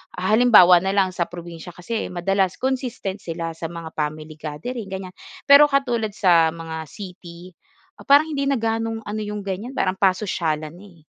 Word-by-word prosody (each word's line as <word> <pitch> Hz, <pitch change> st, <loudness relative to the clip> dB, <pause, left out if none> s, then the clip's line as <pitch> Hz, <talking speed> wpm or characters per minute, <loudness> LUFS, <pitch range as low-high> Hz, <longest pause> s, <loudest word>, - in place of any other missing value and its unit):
Ah, 185 Hz, +1 st, -3 dB
halimbawa 185 Hz, -7 st, +7 dB
na 195 Hz, -, 0 dB
lang 190 Hz, -2 st, +1 dB
sa 175 Hz, -, +1 dB
probinsiya 175 Hz, 0 st, -9 dB
kasi 220 Hz, +3 st, -4 dB
madalas 190 Hz, +1 st, 0 dB
consistent 250 Hz, -7 st, -3 dB
sila 165 Hz, -1 st, -5 dB
sa 165 Hz, 0 st, -6 dB
mga 165 Hz, -1 st, -8 dB
family 155 Hz, 0 st, -4 dB
gathering 190 Hz, +9 st, -6 dB
ganyan. 190 Hz, -1 st, -7 dB, 0.3 s
Pero 285 Hz, +1 st, +8 dB
katulad 240 Hz, -6 st, 0 dB
sa 170 Hz, -5 st, +4 dB
mga 160 Hz, -1 st, -7 dB
city 180 Hz, -2 st, -11 dB, 0.4 s
ah, -, -, -11 dB
parang 290 Hz, +2 st, +5 dB
hindi 280 Hz, -, -1 dB
na 275 Hz, -4 st, +1 dB
gaanong 225 Hz, 0 st, -2 dB
ano 215 Hz, +1 st, -4 dB
yung 210 Hz, -1 st, -5 dB
ganyan 205 Hz, +7 st, -4 dB
parang 185 Hz, -5 st, 0 dB
pasosyalan 170 Hz, -5 st, -1 dB
na, 195 Hz, +4 st, -14 dB, 0.2 s
eh. 155 Hz, -, -31 dB
185 Hz, 170 wpm, -22 LUFS, 170-225 Hz, 0.4 s, Pero